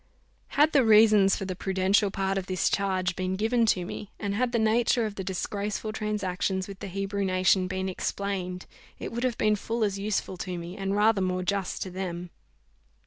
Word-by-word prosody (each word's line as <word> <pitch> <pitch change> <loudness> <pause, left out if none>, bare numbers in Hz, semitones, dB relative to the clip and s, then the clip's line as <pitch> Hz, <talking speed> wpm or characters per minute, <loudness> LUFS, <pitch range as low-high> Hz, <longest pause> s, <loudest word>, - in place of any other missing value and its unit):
Had 300 +2 +5
the 280 -4 +4
reasons 215 -3 +6
for 195 - -4
the 185 -1 -4
prudential 190 +2 +2
part 195 0 -1
of 195 -1 -3
this 185 -1 0
charge 185 -2 0
been 185 0 -2
given 225 +3 +2
to 180 -4 +2
me, 200 +2 -7
and 200 -2 -2
had 240 +3 0
the 240 - +1
nature 230 +1 +2
of 215 - -4
the 195 - -5
disgraceful 205 +3 -3
transactions 195 -3 -2
with 195 -1 -9
the - - -6
Hebrew 195 +1 -2
nation 185 0 +2
been 190 +1 -2
explained, 185 -1 -3 0.3
it - - -6
would 235 +1 -3
have 255 -2 0
been 215 0 +3
full 225 +3 -2
as 200 -2 0
useful 200 -2 -2
to 180 0 -4
me, 170 +2 -7
and 195 0 -2
rather 210 -1 +3
more 185 0 0
just 195 0 -1
to 185 - -7
them. 180 -1 -5
195 Hz, 195 wpm, -27 LUFS, 185-215 Hz, 0.3 s, reasons